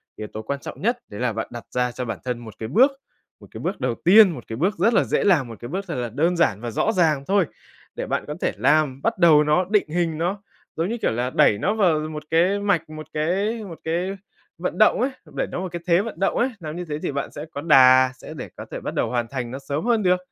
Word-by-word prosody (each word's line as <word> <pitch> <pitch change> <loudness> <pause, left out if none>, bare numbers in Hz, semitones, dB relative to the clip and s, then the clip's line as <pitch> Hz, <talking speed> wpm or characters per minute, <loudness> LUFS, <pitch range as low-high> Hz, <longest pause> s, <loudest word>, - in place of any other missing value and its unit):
yếu 105 - -6
tố 110 - -7
quan 140 +5 -4
trọng - - -9
nhất 240 +4 +1
đấy 105 +3 -7
là 125 -3 0
bạn 110 - -3
đặt 120 -2 -7
ra 125 0 +1
cho 125 +1 -5
bản 115 - -4
thân 125 -2 -2
một 115 -3 -10
cái 110 - -4
bước, 260 - +5 0.5
một - - -15
cái - - -8
bước 190 +3 -3
đầu 125 -2 0
tiên, 205 +3 +7
một 125 -8 -8
cái 110 - -5
bước 185 - 0
rất 220 +7 +3
là - - +4
dễ - - 0
làm, 165 -11 +3
một 115 - -10
cái 120 - -8
bước 190 +4 -3
thật - - -4
là 120 -2 -3
đơn 165 +9 +1
giản 110 -11 +2
và 120 -1 -4
rõ 220 - +1
ràng 160 -8 +2
thôi, 195 -3 +3 0.5
để - - -4
bạn - - -2
có 150 - -4
thể - - +1
làm, 150 -3 +2
bắt 230 0 0
đầu 160 -4 +6
nó, 150 +5 +2
định 210 -7 +2
hình 165 -1 -1
nó, 180 +5 -2 0.3
giống 165 +4 -1
như, 235 - -2
kiểu, - - +1
là 120 +2 -1
đẩy 105 -5 +4
nó 205 - 0
vào 180 -8 +3
một 155 0 -5
cái 180 +5 +3
mạch, 190 -6 0
một 155 0 -8
cái 195 +9 -1
một 175 -5 -9
cái 180 +4 -2 0.4
vận 175 0 -3
động 215 +3 +4
ấy, 260 - +2 0.3
đẩy - - -1
nó - - -5
vào 185 -1 -4
cái 175 0 -6
thế 170 +2 +4
vận 205 -5 -7
động 195 - +1
ấy, 250 +3 +2
làm 155 -2 -6
như 180 0 -5
thế 150 -1 -4
thì - - -3
bạn 140 0 -4
sẽ 150 - -7
có 145 - -5
đà, 130 -4 +6
sẽ - - -10
để - - -7
có - - -8
thể - - -4
bắt - - -4
đầu - - 0
hoàn 120 -2 -1
thành 125 -1 -5
nó 135 - -5
sớm 140 +6 -4
hơn 230 -3 +2
được. 180 0 +4
160 Hz, 280 wpm, -23 LUFS, 130-190 Hz, 0.5 s, tiên